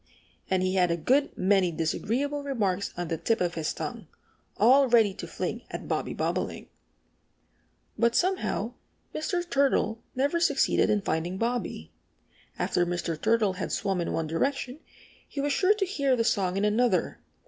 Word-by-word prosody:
And 185 Hz, -1 st, +1 dB
he 185 Hz, 0 st, 0 dB
had 180 Hz, -2 st, +3 dB
a 170 Hz, -, 0 dB
good 270 Hz, -, +1 dB
many 190 Hz, -2 st, +3 dB
disagreeable 240 Hz, -, -1 dB
remarks 205 Hz, -9 st, -1 dB
on 175 Hz, -1 st, -3 dB
the 165 Hz, -2 st, -2 dB
tip 225 Hz, +7 st, +1 dB
of 175 Hz, -1 st, 0 dB
his 160 Hz, -2 st, -2 dB
tongue, -, -, -6 dB, 0.5 s
all 265 Hz, +5 st, +6 dB
ready 225 Hz, -5 st, +4 dB
to -, -, -7 dB
fling -, -, -4 dB
at -, -, -6 dB
Bobby -, -, -2 dB
Bobolink. -, -, -2 dB, 1.3 s
But 235 Hz, 0 st, +3 dB
somehow 355 Hz, -, 0 dB, 0.4 s
Mr. 350 Hz, +3 st, -2 dB
Turtle 275 Hz, -7 st, +1 dB
never 285 Hz, +6 st, +1 dB
succeeded 340 Hz, -, +2 dB
in 210 Hz, -1 st, +2 dB
finding 175 Hz, +2 st, -2 dB
Bobby. 230 Hz, -, -3 dB, 0.7 s
After 175 Hz, -, +1 dB
Mr. 175 Hz, -1 st, -2 dB
Turtle 220 Hz, -3 st, +2 dB
had 185 Hz, +1 st, -4 dB
swum 195 Hz, -3 st, -1 dB
in 170 Hz, -, -2 dB
one 165 Hz, -, -1 dB
direction 260 Hz, -, -2 dB, 0.5 s
he 285 Hz, -, -7 dB
was 285 Hz, 0 st, +1 dB
sure 395 Hz, +6 st, +3 dB
to 410 Hz, -2 st, 0 dB
hear 280 Hz, -8 st, +1 dB
the 230 Hz, -, +1 dB
song 190 Hz, -4 st, +1 dB
in 200 Hz, -, +1 dB
another. 210 Hz, -4 st, +1 dB
220 Hz, 160 wpm, -27 LUFS, 180-275 Hz, 1.3 s, all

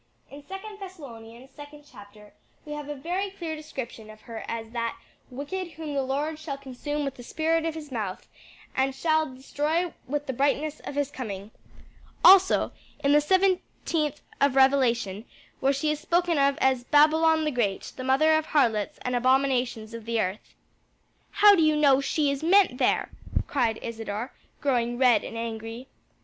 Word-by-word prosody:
In 285 Hz, +1 st, -11 dB
second 410 Hz, +2 st, -8 dB
Thessalonians, 260 Hz, -, -11 dB
second 295 Hz, 0 st, -12 dB
chapter, 210 Hz, -3 st, -15 dB, 0.3 s
we 300 Hz, -, -9 dB
have 295 Hz, -1 st, -6 dB
a 295 Hz, -, -4 dB
very 360 Hz, +8 st, -2 dB
clear 340 Hz, -5 st, -5 dB
description 255 Hz, -7 st, -8 dB
of 215 Hz, 0 st, -13 dB
her 230 Hz, -1 st, -8 dB
as 225 Hz, -1 st, -5 dB
that 230 Hz, -1 st, -3 dB, 0.3 s
'Wicked 335 Hz, +7 st, -5 dB
whom 310 Hz, -2 st, -6 dB
the 280 Hz, -, +1 dB
Lord 290 Hz, +4 st, -2 dB
shall 300 Hz, -3 st, -5 dB
consume 280 Hz, +2 st, -4 dB
with 275 Hz, -1 st, -5 dB
the -, -, -9 dB
spirit 320 Hz, +4 st, 0 dB
of 325 Hz, -, -3 dB
his 300 Hz, -3 st, -8 dB
mouth, 210 Hz, -6 st, -4 dB, 0.5 s
and 265 Hz, 0 st, +1 dB
shall 315 Hz, +1 st, +1 dB
destroy 300 Hz, +6 st, -2 dB
with 290 Hz, +2 st, -2 dB
the 265 Hz, -, -3 dB
brightness 285 Hz, +3 st, 0 dB
of -, -, -8 dB
his 285 Hz, -1 st, -1 dB
coming.' 210 Hz, -6 st, -6 dB, 0.7 s
Also, 380 Hz, 0 st, +7 dB, 0.3 s
in 280 Hz, -, +3 dB
the 295 Hz, +1 st, +6 dB
seventeenth 345 Hz, -4 st, 0 dB, 0.2 s
of 280 Hz, -1 st, +3 dB
Revelation, 245 Hz, -7 st, +3 dB, 0.4 s
where 270 Hz, -, +3 dB
she 280 Hz, +3 st, 0 dB
is 300 Hz, -, -2 dB
spoken 340 Hz, 0 st, +1 dB
of 280 Hz, 0 st, +3 dB
as 260 Hz, -2 st, +2 dB
'Babylon 315 Hz, +3 st, +4 dB
the 305 Hz, -, 0 dB
great, 215 Hz, -7 st, -2 dB
the 255 Hz, -, -6 dB
mother 275 Hz, +5 st, +4 dB
of 315 Hz, 0 st, 0 dB
harlots 225 Hz, -8 st, +1 dB
and 250 Hz, 0 st, -1 dB
abominations 250 Hz, -3 st, +1 dB
of 230 Hz, -1 st, -8 dB
the 230 Hz, 0 st, -1 dB
earth.'" 190 Hz, 0 st, -3 dB, 0.7 s
"How 415 Hz, -1 st, +7 dB
do 340 Hz, -, +2 dB
you 310 Hz, -1 st, +4 dB
know 280 Hz, -3 st, +4 dB
she 290 Hz, +1 st, +1 dB
is 280 Hz, -, -3 dB
meant 345 Hz, -5 st, +4 dB
there?" -, -, +1 dB, 0.4 s
asked 235 Hz, -6 st, +1 dB
Isadore, 225 Hz, +1 st, -5 dB, 0.3 s
growing 240 Hz, -3 st, 0 dB
red 250 Hz, -2 st, +4 dB
and 230 Hz, -, -7 dB
angry. 225 Hz, +1 st, -5 dB
275 Hz, 170 wpm, -26 LUFS, 240-310 Hz, 0.7 s, Also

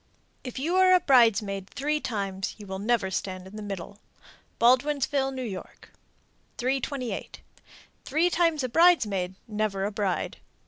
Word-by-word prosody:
If 250 Hz, -1 st, -7 dB
you 330 Hz, +7 st, 0 dB
are 370 Hz, 0 st, +6 dB
a -, -, +5 dB
bridesmaid 210 Hz, -, +3 dB
three 300 Hz, +3 st, -1 dB
times 195 Hz, -7 st, -3 dB
you 210 Hz, -, -10 dB
will 190 Hz, -1 st, -5 dB
never 210 Hz, -2 st, 0 dB
stand 185 Hz, 0 st, -4 dB
in 190 Hz, +2 st, -12 dB
the 215 Hz, -, -6 dB
middle. 200 Hz, 0 st, -7 dB, 0.6 s
Baldwinsville, 270 Hz, +3 st, +3 dB
N.Y. 220 Hz, -8 st, -4 dB, 0.9 s
328. 260 Hz, 0 st, -3 dB, 0.6 s
Three 325 Hz, +5 st, +1 dB
times 330 Hz, -5 st, +2 dB
a 255 Hz, -, -1 dB
bridesmaid, 215 Hz, -, +3 dB
never 210 Hz, -3 st, -1 dB
a 205 Hz, -, -2 dB
bride. 200 Hz, -3 st, -2 dB
230 Hz, 135 wpm, -27 LUFS, 195-280 Hz, 0.9 s, are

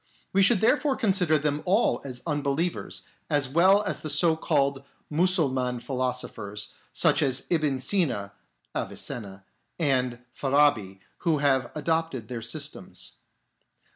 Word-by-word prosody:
We 195 Hz, -, +4 dB
should 195 Hz, +1 st, +5 dB
therefore 280 Hz, +4 st, +3 dB
consider 190 Hz, -8 st, +3 dB
them 150 Hz, 0 st, -1 dB
all 195 Hz, +6 st, +2 dB
as 125 Hz, -3 st, -7 dB
unbelievers, 150 Hz, +2 st, -1 dB, 0.3 s
as 145 Hz, -3 st, +2 dB
well 185 Hz, +8 st, +4 dB
as 195 Hz, -, -3 dB
the 155 Hz, -, -6 dB
so 160 Hz, +3 st, +4 dB
called 140 Hz, -3 st, 0 dB, 0.3 s
Mussulman 145 Hz, -8 st, +1 dB
philosophers, 125 Hz, -5 st, -3 dB, 0.2 s
such -, -, +3 dB
as 135 Hz, -2 st, +1 dB
Ibn 150 Hz, -6 st, +1 dB
Sina 125 Hz, -, 0 dB, 0.4 s
(Avicenna) 100 Hz, -4 st, -5 dB, 0.3 s
and 130 Hz, -6 st, +1 dB, 0.2 s
Farabi, 135 Hz, -9 st, +2 dB, 0.2 s
who 165 Hz, -3 st, +1 dB
have 135 Hz, -4 st, +2 dB
adopted 160 Hz, -7 st, -1 dB
their 120 Hz, -2 st, -4 dB
systems. 120 Hz, -, -4 dB
145 Hz, 120 wpm, -26 LUFS, 125-165 Hz, 0.4 s, should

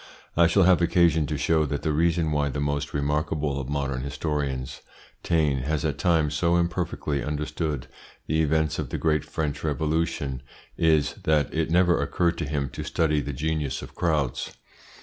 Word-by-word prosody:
I 85 Hz, 0 st, +5 dB
shall 95 Hz, +3 st, +4 dB
have 90 Hz, -1 st, +5 dB
occasion 85 Hz, -3 st, +3 dB
to 75 Hz, +1 st, -2 dB
show 80 Hz, +3 st, +2 dB
that 70 Hz, +2 st, -3 dB
the 80 Hz, -, +1 dB
reason 80 Hz, 0 st, +2 dB
why 75 Hz, -1 st, +1 dB
the 70 Hz, -, -4 dB
most 70 Hz, 0 st, -1 dB
remarkable 75 Hz, 0 st, -1 dB
of 65 Hz, -, -7 dB
modern 70 Hz, -3 st, -2 dB
historians, 70 Hz, -2 st, -3 dB, 0.4 s
Taine, 75 Hz, -5 st, +1 dB
has 75 Hz, +3 st, -1 dB
at -, -, -1 dB
times 80 Hz, -4 st, +2 dB
so 85 Hz, +3 st, +2 dB
imperfectly 85 Hz, -5 st, -1 dB
understood 75 Hz, -1 st, -3 dB, 0.4 s
the 80 Hz, +1 st, +1 dB
events 80 Hz, 0 st, +1 dB
of -, -, -3 dB
the -, -, -3 dB
great 75 Hz, -2 st, +1 dB
French 75 Hz, -3 st, -3 dB
Revolution 75 Hz, -3 st, -1 dB, 0.3 s
is, 80 Hz, -3 st, +2 dB
that 75 Hz, -3 st, +2 dB
it 80 Hz, 0 st, 0 dB
never 90 Hz, +1 st, +3 dB
occurred 85 Hz, -1 st, 0 dB
to 80 Hz, -, -1 dB
him 70 Hz, -2 st, -1 dB
to -, -, -6 dB
study 75 Hz, -2 st, +1 dB
the 70 Hz, -, -4 dB
genius 75 Hz, -1 st, -2 dB
of -, -, -10 dB
crowds. 75 Hz, -7 st, -1 dB
75 Hz, 170 wpm, -25 LUFS, 70-80 Hz, 0.4 s, I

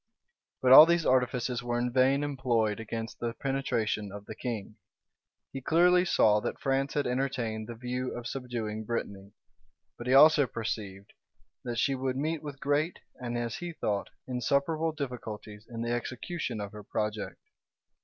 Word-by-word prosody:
But 130 Hz, -, +4 dB
all 150 Hz, +4 st, +12 dB
these 170 Hz, -1 st, +2 dB
artifices 125 Hz, -1 st, +1 dB
were 120 Hz, -1 st, -2 dB
in 120 Hz, 0 st, -1 dB
vain 135 Hz, +2 st, +3 dB
employed 120 Hz, -7 st, 0 dB
against 115 Hz, 0 st, -5 dB
the 120 Hz, 0 st, -3 dB
penetration 115 Hz, -7 st, -1 dB
of 100 Hz, 0 st, -9 dB
the -, -, -7 dB
king. 110 Hz, -4 st, -5 dB, 0.8 s
He 135 Hz, -, -5 dB
clearly 180 Hz, +5 st, +4 dB
saw 105 Hz, -, +4 dB
that -, -, -4 dB
France 135 Hz, +1 st, 0 dB
had 145 Hz, -, +1 dB
entertained 125 Hz, -4 st, -2 dB
the 120 Hz, -, -6 dB
view 125 Hz, +2 st, -4 dB
of 120 Hz, -, -7 dB
subduing 120 Hz, -4 st, -4 dB
Brittany; 100 Hz, -3 st, -4 dB, 0.7 s
but 120 Hz, -, -6 dB
he 130 Hz, -, +3 dB
also 150 Hz, -1 st, +7 dB
perceived, 105 Hz, -4 st, -5 dB, 0.5 s
that 120 Hz, -1 st, -4 dB
she 135 Hz, +4 st, +2 dB
would 130 Hz, -1 st, -2 dB
meet 155 Hz, +3 st, -1 dB
with 145 Hz, -2 st, -8 dB
great, 145 Hz, +5 st, 0 dB, 0.2 s
and, 120 Hz, -1 st, -4 dB
as 120 Hz, -1 st, -3 dB
he 175 Hz, -1 st, -5 dB
thought, 105 Hz, -9 st, -2 dB, 0.2 s
insuperable 140 Hz, +6 st, 0 dB
difficulties 115 Hz, -7 st, -7 dB
in 115 Hz, -1 st, -4 dB
the 120 Hz, -, -2 dB
execution 125 Hz, +1 st, -3 dB
of 100 Hz, -1 st, -5 dB
her 105 Hz, -, -9 dB
project. 105 Hz, 0 st, -3 dB
125 Hz, 160 wpm, -29 LUFS, 110-135 Hz, 0.8 s, all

